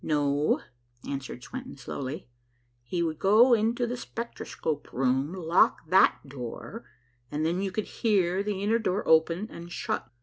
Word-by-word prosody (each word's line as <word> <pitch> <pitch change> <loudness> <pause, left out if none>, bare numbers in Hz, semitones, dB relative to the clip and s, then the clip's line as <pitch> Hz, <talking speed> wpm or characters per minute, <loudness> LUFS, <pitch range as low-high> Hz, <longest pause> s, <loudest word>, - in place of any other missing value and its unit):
"No," 145 -1 +1 0.5
answered 135 -2 -5
Swenton 260 +1 -8
slowly, 135 +1 -5 0.5
"he 170 +9 -2
would 160 -2 -2
go 220 +6 +6
into 235 +2 +2
the 240 +1 -3
spectroscope 235 -10 -5
room, 135 +3 +1
lock 175 -2 +2
that 185 -5 +4
door, 135 - -7 0.4
and 150 +1 -1
then 175 +3 0
you 195 -1 -1
could 215 +2 -2 0.2
hear 190 -4 +3
the 200 -1 -2
inner 225 +3 +2
door 200 -2 -1
open 165 +5 +4
and 170 +1 -9
shut. 220 - -3
175 Hz, 145 wpm, -28 LUFS, 150-215 Hz, 0.5 s, go